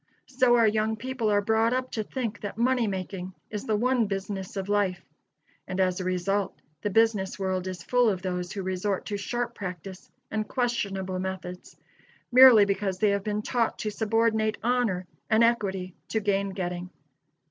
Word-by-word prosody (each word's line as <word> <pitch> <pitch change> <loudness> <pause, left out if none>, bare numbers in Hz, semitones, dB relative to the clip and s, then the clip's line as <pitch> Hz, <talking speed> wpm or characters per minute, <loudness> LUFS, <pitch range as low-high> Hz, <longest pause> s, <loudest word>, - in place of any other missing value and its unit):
So 255 -2 +3
our 230 -1 +5
young 215 +1 +1
people 255 -1 -2
are 205 -1 +2
brought 225 +2 +2
up 255 0 -2
to 220 - -2
think 225 -1 -4
that 205 - -5
money 245 0 +2
making 185 -1 -5 0.2
is 210 +3 -4
the 215 - +2
one 240 0 +2
business 195 0 -4
of 195 0 -3
life; 200 -3 +1 0.7
and 185 - -4
as 185 -1 +2
a - - -3
result 185 +2 -1 0.2
the 205 - -1
business 215 -2 +2
world 190 -1 -2
is 180 -2 -6
full 245 -2 +3
of 190 -2 -2
those 180 -1 -3
who 195 -1 -4
resort 190 +1 -2
to 205 - -3
sharp 240 +4 -3
practice 185 0 -7 0.2
and 215 0 -2
questionable 195 -7 -1
methods, 185 -1 -6 0.5
merely 250 -4 +9
because 195 -1 -1
they 210 +2 +3
have 200 -1 0
been 210 0 -2
taught 235 -1 0
to 215 - -3
subordinate 220 0 +1
honor 230 -7 +1 0.2
and 220 +1 +5
equity 195 -6 0
to 220 - 0
gain 200 -1 0
getting. 180 -2 -4
205 Hz, 175 wpm, -27 LUFS, 190-225 Hz, 0.7 s, merely